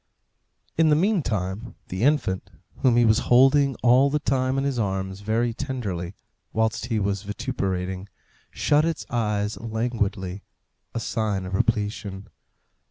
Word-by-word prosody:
In 160 -1 +5
the 150 - +5
meantime 120 - -1
the 95 +2 -4
infant 135 -9 +1 0.3
whom 125 -3 +3
he 120 - +5
was 110 -1 +4
holding 135 +2 +5
all 125 +3 +6
the 150 - +1
time 130 -2 0
in 135 - +1
his 140 -3 -1
arms 95 -2 -2
very 115 +3 0
tenderly 105 -9 -4 0.4
whilst 110 0 0
he 115 - 0
was 100 -1 0
vituperating, 95 -4 -3 0.4
shut 150 +1 +2
its 165 -1 -1
eyes 105 -3 -1
languidly; 110 -4 -2 0.5
a - - 0
sign 105 -4 -1
of 95 - -6
repletion. 105 -3 -1
110 Hz, 135 wpm, -25 LUFS, 100-130 Hz, 0.5 s, all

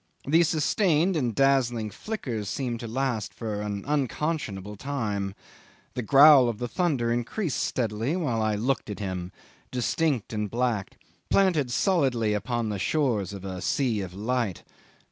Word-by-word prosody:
The 160 +5 +4
sustained 170 +2 +2
and 125 -8 0
dazzling 120 -5 +2
flickers 120 - -4
seemed 120 -4 -2
to 115 - -6
last 120 -2 -2
for 105 -3 -4
an 100 -1 -4
unconscionable 140 - -2
time. 105 -6 -3 0.6
The 125 - -2
growl 135 +1 +7
of 115 - -3
the 120 - -3
thunder 135 -7 0
increased 135 - -2
steadily 115 - -1
while 130 -11 0
I 110 -1 +1
looked 120 +2 -1
at 105 - -4
him, 95 -3 -4 0.4
distinct 125 -1 0
and 105 -1 -2
black, 120 -4 -1 0.3
planted 175 -9 +3
solidly 125 - +2
upon 115 +2 -1
the 105 -2 -3
shores 115 - 0
of 100 -1 -8
a 95 -1 -5
sea 120 -5 0
of 90 -2 -7
light. 110 -1 -1
120 Hz, 145 wpm, -27 LUFS, 105-140 Hz, 0.6 s, growl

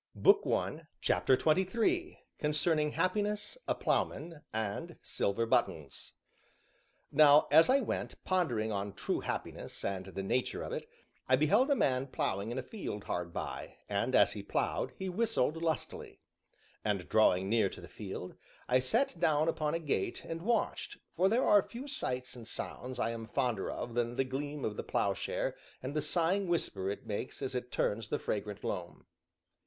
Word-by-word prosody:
CHAPTER 130 - +4
XXIII 230 - +1 0.2
CONCERNING 150 0 +1
HAPPINESS, 210 - 0
A - - +1
PLOUGHMAN, 165 -3 -1
AND 110 -2 -3
SILVER 100 +4 0
BUTTONS 80 -10 -1 1.0
Now 150 -1 +7
as 165 - +7
I 275 +2 +5
went, 225 - -3
pondering 120 - +1
on 100 -1 -2
true - - -1
happiness, - - -5
and 95 -1 -2
the 95 0 -5
nature 125 +6 0
of - - -5
it, - - -5 0.4
I 130 - +7
beheld 200 - +4
a 285 - +5
man 130 - +1
ploughing 100 -4 -1
in 120 - -3
a 130 - -2
field 125 - -5
hard 85 -1 -3
by, - - -5
and, - - 0
as - - +6
he - - -5
ploughed, - - -1
he 190 - -3
whistled 185 - +1
lustily. 160 -3 -3 0.6
And 100 -4 -1
drawing 95 -4 +4
near 110 -2 +3
to - - -10
the 85 - -10
field, 95 0 -7 0.3
I 125 +1 +4
sat 180 - +1
down 155 -2 +3
upon 155 -1 0
a - - 0
gate 155 -4 -1
and 165 0 -4
watched, 225 +3 0 0.2
for 185 +3 +4
there 235 +5 +3
are 205 -1 +7
few 245 +8 -8
sights 125 - -3
and 115 -2 -10
sounds 125 +1 -6
I 115 - +1
am 115 -1 -6
fonder 120 -5 0
of 120 - -4
than 120 0 0
the 135 - +2
gleam 140 +2 -4
of 105 - -3
the - - -3
ploughshare - - 0 0.3
and 130 +2 -3
the 150 - 0
sighing 175 +5 +1
whisper 100 - -1
it 100 - -5
makes 110 +6 -4
as 135 0 -2
it 125 -1 -4
turns 110 +1 0
the - - 0
fragrant 105 -1 -3
loam. - - -4
135 Hz, 165 wpm, -33 LUFS, 110-175 Hz, 1.0 s, Now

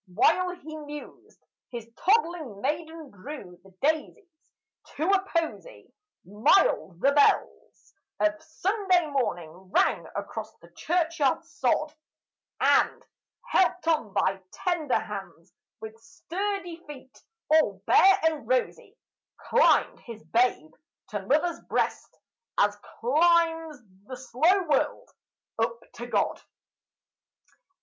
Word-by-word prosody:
While 355 - +2
he 310 -2 -10
mused, 295 -1 -11 0.2
his 235 -2 -7
toddling 340 - 0
maiden 315 +3 -4
drew 200 -4 -10
the 195 - -17
daisies 315 +3 -2 0.4
to 310 +4 -1
a 390 -1 +4
posy; 335 +9 -4 0.3
Mild 205 - +2
the 275 +7 +4
bells 285 0 +1 0.3
of 315 0 +1
Sunday 370 +2 0
morning 175 - -2 0.2
rang - - +1
across - - -5
the - - -19
church 335 -1 -1
yard 275 -3 +2
sod; 285 +2 -1 0.7
And, - - +2 0.4
helped 360 -2 +1
on 310 -11 +1
by 190 0 0
tender 335 -7 0
hands, 185 -4 -8 0.3
with 220 0 -8
sturdy 355 - -5
feet 265 -3 -12 0.3
all 210 -12 +3
bare 385 0 +6
and 320 -2 0
rosy, - - -1 0.4
Climbed 485 +1 +3
his 230 -2 -11
babe 230 -10 +1 0.4
to 205 -2 -5
mother's 320 +5 +1
breast, - - -2 0.4
as 205 0 +3 0.2
climbs 325 +3 +2 0.3
the 255 - -7
slow 315 +10 +2
world 305 -4 -1 0.5
up 480 - 0
to - - -7
God. - - 0
310 Hz, 110 wpm, -27 LUFS, 235-345 Hz, 0.7 s, bare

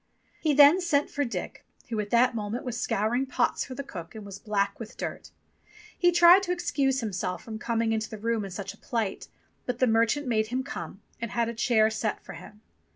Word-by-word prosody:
He 305 -3 +1
then 295 +6 +7
sent 295 -5 +1
for 285 - 0
Dick, 245 - -5 0.3
who 225 -2 -2
at 210 -1 -3
the 240 +3 +4
moment 220 +2 -4
was 245 -1 -3
scouring 240 +6 0
pots - - 0
for 260 - -8
the 280 - -5
cook 170 -9 -9
and 215 -2 -8
was 200 -1 -8
black 200 -2 -1
with 230 0 -9
dirt. - - -5 0.7
He 355 -1 +3
tried 345 +2 +7
to 370 -2 -3
ex 350 -1 -2
cuse 270 -3 +1
himself 185 -4 -3
from 220 -1 -7
coming 230 0 0
into 220 -1 -2
the 220 - -7
room 225 0 -1
in 195 - -6
such 195 +1 -6
a - - -19
plight, 225 -6 -3 0.4
but 250 -1 -2
the 255 - +3
merchant 230 +5 +2
made 220 -3 +1
him 255 +3 -2
come, 195 - -7 0.2
and 230 - -3
had 235 0 0
a - - -4
chair 225 -1 +3
set 220 -1 -2
for - - -8
him. 210 - -12
230 Hz, 220 wpm, -27 LUFS, 215-270 Hz, 0.7 s, then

